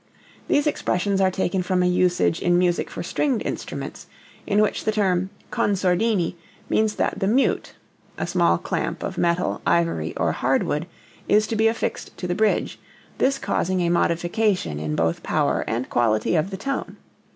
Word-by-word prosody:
These 290 - +2
expressions 195 - 0
are 190 - +4
taken 185 0 -1
from 180 0 +1
a - - +2
usage 180 - +2
in 175 0 +3
music 175 -1 +1
for - - -6
stringed 255 +6 0
instruments, - - -5 0.4
in 205 - +2
which 215 - +1
the 215 - +1
term 190 -3 +1 0.2
con 205 - +1
sordini 185 0 +1 0.4
means 215 -1 +2
that - - -1
the 195 - 0
mute 255 +6 +1 0.4
(a - - -2
small - - +2
clamp - - -3
of - - -4
metal, 170 +1 0
ivory 165 - +1
or - - +1
hardwood) 150 +4 0 0.4
is 215 +1 +4
to 225 - -3
be 220 +1 +3
affixed 225 +1 -3
to - - -5
the 175 - 0
bridge, 215 +3 0 0.4
this 270 +1 +2
causing 185 -3 -1
a 170 - +1
modification 175 - +1
in 75 0 -2
both 80 +1 0
power - - 0
and 120 +3 -2
quality 110 0 +2
of 160 +3 +1
the 190 - -5
tone. 275 +7 -4
180 Hz, 170 wpm, -23 LUFS, 170-210 Hz, 0.4 s, are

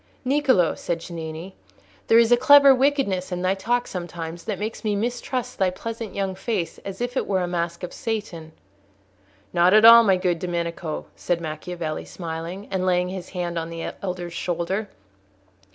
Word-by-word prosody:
"Niccolò," 260 - +3
said 170 -1 -3
Cennini, 165 +1 -7 0.5
"there 225 - +6
is 230 0 +5
a - - +9
clever 280 +2 +7
wickedness 255 -9 +1
in 180 0 -3
thy 185 +1 +2
talk 240 +5 0
sometimes 170 -2 -6
that - - -2
makes 215 +3 -5
me 210 -2 0
mistrust 245 +3 -3
thy 190 -1 +3
pleasant 225 +3 -6
young 195 -1 -1
face 190 -3 -3
as 195 +3 -8
if 245 +1 -2
it - - -1
were 190 -2 +1
a 180 - -1
mask 170 0 -3
of 180 - -5
Satan." 210 - -4 1.0
"Not 180 +3 +5
at 215 +1 +7
all, 230 0 +10
my 195 -4 +4
good 180 -2 0
Domenico," 170 -2 -3
said 175 -1 -1
Macchiavelli, 160 0 -5
smiling, 170 +3 -6
and 190 -1 -1
laying 180 -1 +1
his 185 -1 -7
hand 175 -2 -3
on 165 0 -5
the 165 0 -5
elder's 180 -3 -4
shoulder. 180 +5 -2
185 Hz, 170 wpm, -24 LUFS, 170-220 Hz, 1.0 s, all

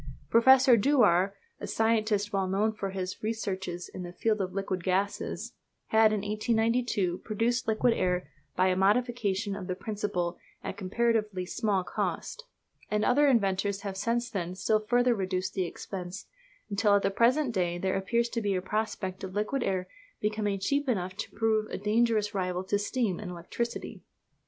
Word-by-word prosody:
Professor 260 +2 +7
Dewar 200 -6 +3 0.2
a - - -5
scientist 215 -2 +1
well 195 -1 +1
known 205 +4 +1
for 200 -2 -4
his 185 -1 -4
researches 190 -5 -3
in - - -8
the 175 -1 -6
field 215 +3 0
of 185 -1 -2
liquid 190 -2 -3
gases 190 +3 -1 0.4
had 220 0 +6
in 215 -2 0
1892 215 -2 0
produced 235 +3 -1
liquid 225 +2 +3
air 180 -2 0 0.3
by 185 +1 +3
a 185 - +2
modification 205 -1 +1
of 195 -2 -6
the 185 - -2
principle 185 -4 -3 0.2
at - - -4
comparatively 210 -1 0
small 200 -1 0
cost; 480 - -3 0.4
and 210 0 +1
other 290 +4 +4
inventors 200 -5 +1
have 200 -2 -5
since 235 +4 0
then 180 -2 -3
still 215 +3 +2
further 245 +3 +2
reduced 190 -3 -2
the 185 -2 -1
expense, 185 +2 -7 0.4
until 205 0 +3
at 200 - +2
the - - +2
present 245 +5 +3
day 175 -3 0
there 190 +1 -1
appears 235 +5 +1
to 235 -1 -3
be 200 -2 0
a - - +1
prospect 195 -1 -3
of 190 0 -6
liquid 215 +6 0
air 185 -4 -1 0.3
becoming 210 -1 -1
cheap 280 +8 0
enough 185 -5 -1
to 210 - -5
prove 220 -1 +1
a - - -4
dangerous 215 0 +1
rival 185 -2 -1
to 200 +2 0
steam 210 -3 -1
and 205 - -6
electricity. 180 +7 -5
205 Hz, 165 wpm, -29 LUFS, 185-225 Hz, 0.4 s, Professor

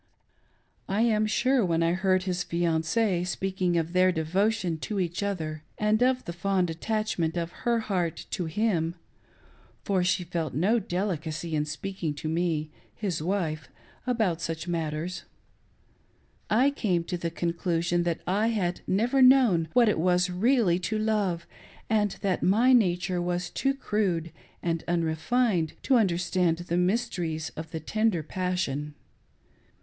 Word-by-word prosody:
I 200 +3 +1
am 215 -2 +3
sure 255 +3 +2
when 165 -2 +1
I 165 - +2
heard 185 0 +2
his 180 -1 -1
fianc6e 175 +3 0
speaking 185 -2 -1
of 165 +1 -1
their 185 0 +4
devotion 180 +2 0
to 205 +5 -3
each 175 0 -2
other, 160 -7 -3 0.2
and 215 +1 +2
of 255 0 +2
the 170 - -5
fond 180 0 0
attachment 175 -2 -1
of 170 0 -2 0.2
her 235 -1 +2
heart 180 -6 -2
to 180 - -2
him 170 -2 0 0.9
(for 190 -3 +1
she 180 0 +1
felt 165 -5 -3
no 200 +10 +3
delicacy 175 -4 -3
in 150 0 0
speaking 160 0 -4
to 150 - -5
me 160 -2 -1
— - - -32
his 185 -7 -2
wife 160 -5 -2 0.2
— - - -29
about 215 -9 +1
such 165 +1 -4
matters,) 165 +1 -3 1.2
I 255 +6 +4
came 185 -11 0
to 180 - -4
the 170 - -2
conclusion 170 0 -1
that 170 -1 -1
I 205 +4 +1
had 185 -6 -1
never 240 +8 +2
known 250 -11 +6
what 245 -2 +5
it 210 - +2
was 180 +1 +3
to 180 - -4
really 205 -3 +3
love, 210 -6 0 0.5
and 210 -3 +1
that 190 -2 0
my 230 +7 +4
nature 180 -5 +2
was 175 0 -2
too 270 0 0
crude 190 - -1 0.3
and 165 -1 -1
unrefined 170 +2 +1
to 265 - +4
understand 180 -4 +1
the 175 0 -3
mysteries 180 -5 -1
of 160 0 -6
the 160 - -5
tender 215 0 0
passion. 155 -5 -2
180 Hz, 150 wpm, -27 LUFS, 165-210 Hz, 1.2 s, known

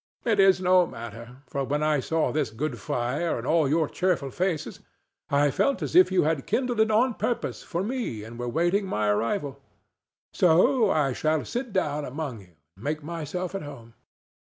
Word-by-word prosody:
It 220 -4 +2
is 195 -1 +6
no 180 -1 +4
matter; 115 +3 -10
for 140 - -3
when 145 +3 -1
I 155 -1 +2
saw 160 +4 0
this 150 -5 0
good 120 +2 -4
fire 125 - -1
and 115 - -6
all 155 -1 +2
your 155 +1 +2
cheerful 175 -7 -1
faces, 175 0 -2 0.5
I 145 0 +3
felt 210 - +1
as - - -4
if 365 +1 +7
you 185 - +3
had 155 -3 -1
kindled 250 -3 0
it 220 0 +4
on 235 +4 +3
purpose 240 +2 -2
for 175 +2 -3
me 220 - -3
and 115 +2 -10
were 120 0 -3
waiting 175 - +1
my 105 - 0
arrival. 135 - -1 0.7
So 205 +7 +4
I 140 -6 +1
shall 155 +3 0
sit 245 -1 -4
down 150 -6 -1
among 140 -3 -5
you 90 -3 -20 0.2
and 100 - -16
make 150 +1 -2
myself 170 +3 -4
at 195 - -3
home." 125 -6 -10
155 Hz, 185 wpm, -26 LUFS, 135-185 Hz, 0.7 s, if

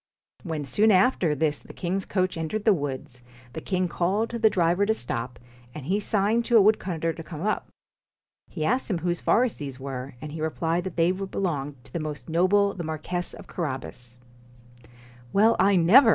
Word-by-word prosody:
When 160 -5 -4
soon 210 - +3
after 185 -5 +3
this 150 0 0
the - - -13
king's 190 +2 -2
coach 185 -1 0
entered 165 +6 -3
the 215 - +6
woods, 135 -6 -5 0.3
the 160 - -5
king 185 0 0
called 190 +6 0
to 235 - -3
the 220 -1 +5
driver 175 0 +2
to 220 +2 +2
stop, 120 - -4 0.4
and 150 -4 -7
he 190 +6 +1
signed 210 +2 +1
to 240 - +5
a - - +8
woodcutter 180 -6 +1
to 165 - -8
come 160 0 -7
up. 215 +1 -1 0.8
He 155 -3 -3
asked 250 +6 0
him 190 - 0
whose 175 +1 -2
forests 245 0 +2
these 140 -3 -6
were, 135 -1 -6
and 150 +2 -7
he 155 +1 -6
re 160 - +1
plied 165 +3 -1
that 190 - -5
they 170 +1 +3
belonged 170 -8 -3
to - - -17
the 170 - -2
most 155 0 -6
noble 200 +4 +3
the 175 - -5
Marquess 160 +3 -3
of - - -11
Carabas. 130 -6 -5 0.7
1 - - -21 0.4
Well, 220 +3 +5
I 195 +1 +5
never 210 +9 +7
175 Hz, 195 wpm, -26 LUFS, 155-200 Hz, 0.8 s, a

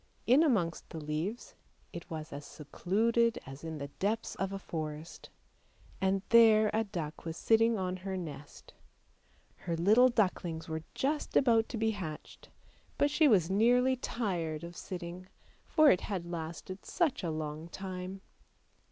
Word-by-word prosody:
In 255 +5 +6
amongst 200 - +1
the 160 - -6
leaves 155 +9 -4 0.4
it 170 - -8
was 155 -2 -6
as 145 +1 -6
secluded 225 +11 0
as 135 +3 -10
in 160 -1 -5
the 140 -1 -6
depths 220 +3 -1
of 195 0 -3
a 195 - -3
forest; 155 -3 -6 0.7
and 190 0 +1
there 220 -2 +6
a 220 - +2
duck 165 -6 -5
was 165 -1 -5
sitting 225 0 +3
on 185 -1 -2
her 190 +1 -4
nest. 150 -5 -9 0.8
Her 170 -1 -3
little 215 +9 +6
ducklings 180 -8 -1
were 160 0 -3
just 295 +3 0
about 230 -4 +4
to 235 - -4
be 220 0 +1
hatched, 170 -8 -8 0.5
but 285 - +2
she 310 +1 +4
was 190 - +4
nearly 245 +5 +4
tired 175 -11 -3
of 170 +1 -8
sitting, 180 0 -7 0.4
for 310 -3 +6
it 180 - +2
had 185 -4 -4
lasted 170 +2 -6
such 340 -7 0
a 170 - -1
long 155 0 -4
time. 185 +1 -6
185 Hz, 150 wpm, -32 LUFS, 160-225 Hz, 0.8 s, In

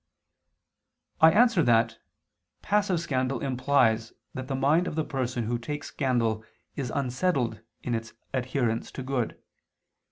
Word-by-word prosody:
I 160 - +8
answer 230 -1 +5
that, 115 -3 +3 0.6
Passive 200 -4 +2
scandal 130 -5 -1
implies 125 -4 +2 0.2
that 130 0 -5
the 135 - -2
mind 150 +7 +3
of - - -4
the 160 - +1
person 125 -3 -2
who 120 +2 -1
takes 145 +5 -5
scandal 115 -5 0 0.3
is 135 -4 -3
unsettled 130 - 0 0.2
in 125 - -2
its 115 -1 -3 0.2
adherence 125 -3 -1
to 130 - -5
good. 130 -3 -2
130 Hz, 130 wpm, -27 LUFS, 120-145 Hz, 0.6 s, I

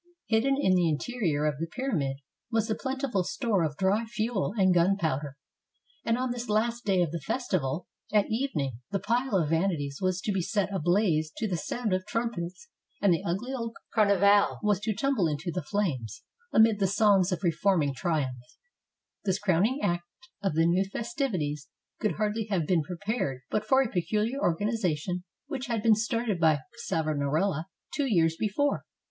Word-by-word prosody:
Hidden 235 +5 +2
in 190 -9 +3
the 175 -2 +3
interior 160 -2 -1
of 150 -2 0
the 165 - -2
pyramid 165 - -2 0.3
was 225 -2 +1
a - - +4
plentiful 265 -6 -1
store 210 0 0
of 150 -2 -2
dry 195 +4 +2
fuel 220 -3 -1
and 190 -2 +4
gunpowder; 160 -6 +1 0.7
and 230 +1 +1
on 255 0 -1
this 245 -1 -5
last 230 +3 0
day 190 -3 +3
of 165 - -2
the 170 - -3
festival, 170 - -1 0.3
at 210 -1 +4
evening, 160 - -2
the 200 - 0
pile 245 +2 0
of 165 -6 +2
vanities 160 -5 0
was 185 -1 +1
to 210 - -1
be 195 -2 0
set 200 +2 -1
ablaze 175 -3 +2
to 225 - -1
the 185 - -1
sound 215 +5 -2
of 185 0 0
trum 230 +1 -1
pets, 180 - -6 0.3
and 195 -3 +4
the 165 - 0
ugly 200 +10 -2
old 230 -3 -4 0.2
Carnival 200 -1 +4
was 205 -3 +2
to 215 0 -2
tumble 245 -5 +1
into 155 +3 -2
the 180 - -2
flames 150 - -2 0.3
amid 220 -1 +5
the 195 - +3
songs 200 -2 +4
of 180 - -2
reforming 170 -4 +2
triumph. 130 -6 -3 0.7
This 190 -2 +1
crowning 205 - +1
act 175 0 0 0.3
of 195 -6 -1
the 165 +1 +4
new 175 +3 +3
festivities 195 - -3 0.3
could 215 - 0
hardly 215 +1 -1
have 180 -6 +1
been 170 0 +2
prepared 175 - -3
but 215 0 0
for 265 +3 +5
a - - -2
pecuHar 215 +6 -1
organization 180 - 0 0.2
which 275 -3 -5
had 230 -3 -1
been 225 - +6
started 220 -2 0
by 155 -3 +4 0.3
Savonarola 155 +2 0 0.3
two 285 -2 0
years 165 -4 +3
before. 220 +10 0
195 Hz, 175 wpm, -28 LUFS, 165-225 Hz, 0.7 s, been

